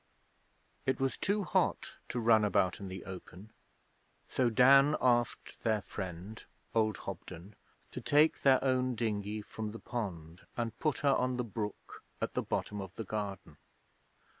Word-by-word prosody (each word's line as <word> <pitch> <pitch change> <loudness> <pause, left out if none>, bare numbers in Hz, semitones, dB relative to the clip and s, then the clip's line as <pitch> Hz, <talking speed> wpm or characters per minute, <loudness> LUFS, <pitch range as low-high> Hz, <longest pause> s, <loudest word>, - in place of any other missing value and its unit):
It 130 - +1
was 135 0 0
too 205 +1 0
hot - - 0
to 120 - -2
run 110 -2 +5
about 95 -3 +2
in 100 - -6
the 95 0 -7
open, 95 +2 -10 0.8
so 125 -2 +1
Dan 135 +5 +6
asked 120 -1 +1
their 110 -3 +1
friend, 95 +2 -7 0.3
old 110 -3 +2
Hobden, 95 +5 -8 0.4
to - - -5
take 150 +2 +4
their 135 -1 +5
own 130 -1 +1
dinghy 105 -1 -2
from 110 0 -6
the 115 - -7
pond 90 -7 -5 0.2
and 115 -1 -2
put 155 -2 0
her 140 - +6
on 125 -1 +1
the 125 - 0
brook 105 -2 -6 0.2
at - - -2
the - - 0
bottom 105 -1 -3
of 95 -1 -9
the 115 - -4
garden. 100 -7 -5
110 Hz, 155 wpm, -32 LUFS, 100-125 Hz, 0.8 s, Dan